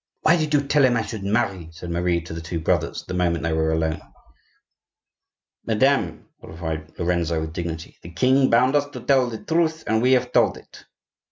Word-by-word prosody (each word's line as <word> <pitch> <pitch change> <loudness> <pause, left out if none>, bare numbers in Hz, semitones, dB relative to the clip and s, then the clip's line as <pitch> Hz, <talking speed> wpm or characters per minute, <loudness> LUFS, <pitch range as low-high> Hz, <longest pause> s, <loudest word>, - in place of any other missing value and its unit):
"Why 165 - +5
did 155 -3 -1
you 145 - +3
tell 145 0 +3
him 125 -2 +4
I 115 - 0
should 110 -4 -6
marry?" 100 -5 -1
said 85 +1 -8
Marie 85 0 0
to 85 0 -9
the 80 - -6
two 80 +1 -4
brothers, 80 - -1
the - - -5
moment 85 -2 0
they 85 -1 0
were 80 0 +1
alone. 80 0 -1 1.6
"Madame," 115 - +1
replied 80 -1 -6
Lorenzo, 85 -2 0
with 80 0 -5
dignity, 85 -2 -6
"the 85 - -10
king 130 +9 +3
bound 125 +4 +3
us 145 0 +2
to 125 - -6
tell 130 0 +2
the 110 -2 -8
truth, 160 -1 0
and 110 0 +1
we 130 +2 +4
have 125 - +1
told - - +3
it." - - -16
90 Hz, 195 wpm, -23 LUFS, 85-130 Hz, 1.6 s, Why